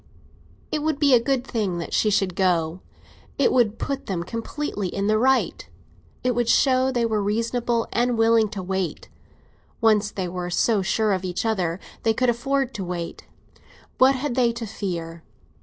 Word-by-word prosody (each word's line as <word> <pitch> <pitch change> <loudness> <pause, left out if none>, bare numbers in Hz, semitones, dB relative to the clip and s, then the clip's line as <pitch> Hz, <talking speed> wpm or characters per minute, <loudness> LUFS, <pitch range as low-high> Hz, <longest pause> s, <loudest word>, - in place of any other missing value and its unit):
It 305 - -1
would 310 -1 0
be 285 -2 +4
a 245 - +7
good 255 +1 -1
thing 205 -9 -2
that 170 - -5
she 215 - +3
should 195 -3 +1
go; 175 -2 +1 0.6
it 280 - +3
would 230 -4 +2
put 275 -1 -4
them 180 -3 -2
completely 230 - -4
in 195 +2 -3
the 215 +1 +2
right. 265 +2 +1 0.5
It 250 0 +2
would 240 -1 0
show 260 -1 +3
they 240 -2 +1
were 220 -2 0
reasonable 230 +3 0
and 240 0 +1
willing 225 -1 +4
to 195 -3 -6
wait. 190 -3 -3 0.7
Once 215 -2 +3
they 190 -3 -4
were 175 0 -4
so 205 +4 +2
sure 210 +2 +1
of 185 -1 -2
each 180 +3 -3
other, 185 -6 0 0.2
they 225 -1 +1
could 255 0 +3
afford 270 +2 -1
to 200 - -4
wait—what 180 +8 -3
had 260 0 -2
they 240 -2 +3
to 235 0 -5
fear? 170 -6 -5
220 Hz, 175 wpm, -24 LUFS, 190-245 Hz, 0.7 s, a